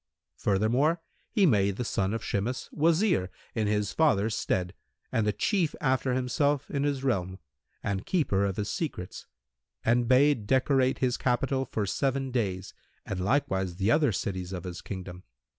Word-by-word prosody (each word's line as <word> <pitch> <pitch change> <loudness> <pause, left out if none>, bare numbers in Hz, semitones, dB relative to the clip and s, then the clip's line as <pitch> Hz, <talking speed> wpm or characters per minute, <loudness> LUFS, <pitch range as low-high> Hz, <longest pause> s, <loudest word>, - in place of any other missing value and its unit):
Furthermore, 120 - +2 0.3
he 205 - +3
made 100 - +3
the 125 - -3
son 95 -3 0
of 115 0 -3
Shimas 115 +6 -2
Wazir 160 - +2 0.2
in 110 -2 0
his 105 -1 0
father's 115 -9 +2
stead, 90 -4 -1 0.4
and 110 -2 +1
the - - +3
chief 175 - 0
after 130 -1 +1
himself 140 +3 0
in 140 - -1
his 140 -2 -1
realm 95 -8 -1 0.5
and 100 -1 -2
keeper 125 - +1
of 95 -2 -1
his 105 -1 -2
secrets 135 - -5 0.6
and 120 +1 +3
bade 130 -3 +4
decorate 130 +1 +3
his 125 -1 0
capital 130 +1 0
for 110 -5 -2
seven 135 +5 -1
days 100 -6 -2 0.3
and 95 -2 -3
likewise 95 -6 0
the 100 +4 +1
other 145 -2 +4
cities 95 -2 -3
of 90 -2 -5
his 90 -1 -6
kingdom. 90 -2 -7
115 Hz, 160 wpm, -28 LUFS, 95-135 Hz, 0.6 s, bade